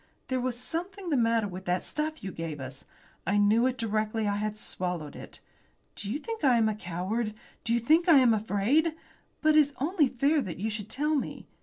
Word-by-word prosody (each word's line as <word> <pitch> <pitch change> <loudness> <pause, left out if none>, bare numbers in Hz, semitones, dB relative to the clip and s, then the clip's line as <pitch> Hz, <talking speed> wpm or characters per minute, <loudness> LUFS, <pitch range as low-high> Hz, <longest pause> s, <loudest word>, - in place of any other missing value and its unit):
There 260 -1 0
was 250 -1 -2
something 355 +6 -4
the - - +3
matter 230 -3 +2
with 185 0 -8
that 180 +1 0
stuff 310 -2 -3
you 190 - -4
gave 165 -3 -5
us. 130 0 -8 0.4
I 200 - +2
knew 215 +4 +4
it 255 -1 -2
directly 215 -1 -1
I 205 0 0
had 215 0 -2
swallowed 180 -7 -4
it. - - -10 0.5
Do 200 0 -5
you 265 - 0
think 450 +4 -6
I 255 -4 +5
am 225 -1 +3
a 215 - +1
coward? 210 +4 -3 0.3
Do 230 - -2
you 235 - +3
think 320 +9 +3
I 320 - +9
am 250 -4 +6
afraid? 225 +10 +1 0.5
But 310 0 +5
it - - +8
is 285 -1 +2
only 305 +1 +2
fair 280 +5 +2
that 190 -9 -5
you 215 +5 -2
should 210 -1 -5
tell 300 +5 0
me. 285 - -2
230 Hz, 215 wpm, -29 LUFS, 205-290 Hz, 0.5 s, I